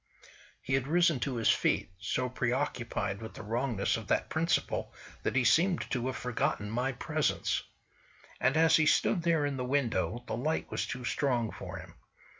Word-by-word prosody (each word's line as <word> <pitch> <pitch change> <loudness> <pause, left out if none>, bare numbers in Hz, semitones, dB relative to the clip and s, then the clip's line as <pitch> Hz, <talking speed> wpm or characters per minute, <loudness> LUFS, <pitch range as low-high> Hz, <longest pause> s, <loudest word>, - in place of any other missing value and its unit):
He 135 - -3
had 135 0 +1
risen 170 -2 +3
to 130 +1 -2
his 115 -2 +3
feet, - - +1
so 125 +3 -1
preoccupied 125 -5 -2
with 110 - -8
the - - -8
wrongness 115 -1 0
of 110 -2 -8
that - - +1
principle 165 +1 0 0.3
that - - -2
he 130 - +4
seemed 170 +8 +4
to 125 -1 -1
have 130 - -3
forgotten 110 -4 -1
my 125 +4 0
presence. 125 - 0 0.8
And 130 +5 +2
as 160 0 +6
he 155 -1 +3
stood 175 +4 +3
there 165 -3 +2
in 140 -2 -2
the 125 - -2
window 120 -5 0
the - - -3
light 150 +7 -2
was - - -2
too 125 0 -5
strong 120 -5 0
for - - -7
him. - - -10
125 Hz, 180 wpm, -31 LUFS, 120-145 Hz, 0.8 s, as